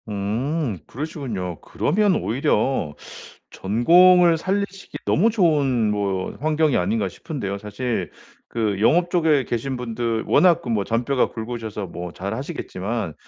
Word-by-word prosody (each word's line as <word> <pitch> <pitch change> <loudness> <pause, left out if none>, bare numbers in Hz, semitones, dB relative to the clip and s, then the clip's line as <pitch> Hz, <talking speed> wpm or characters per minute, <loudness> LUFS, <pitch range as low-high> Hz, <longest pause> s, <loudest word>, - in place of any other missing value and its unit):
음. 110 - -2
그러시군요. 120 - -5
그러면 205 -1 +1
오히려 110 - 0 0.6
전공을 170 - +5
살리시기 195 +2 -3
너무 210 +8 +3
좋은 145 - +2
뭐 100 -2 -2
환경이 155 -1 +2
아닌가 105 +4 0
싶은데요. 100 - -5
사실 105 +4 -3 0.4
그 105 -4 -1
영업 175 +9 +3
쪽에 160 -5 +3
계신 125 +3 -3
분들 115 -2 -2
워낙 175 -2 +4
그 125 - -6
뭐 105 -3 +1
잔뼈가 125 +3 +1
굵으셔서 110 -3 -5
뭐 90 0 -7
잘 100 +3 -4
하시겠지만 115 - -4
120 Hz, 285 characters per minute, -22 LUFS, 105-160 Hz, 0.6 s, 전공을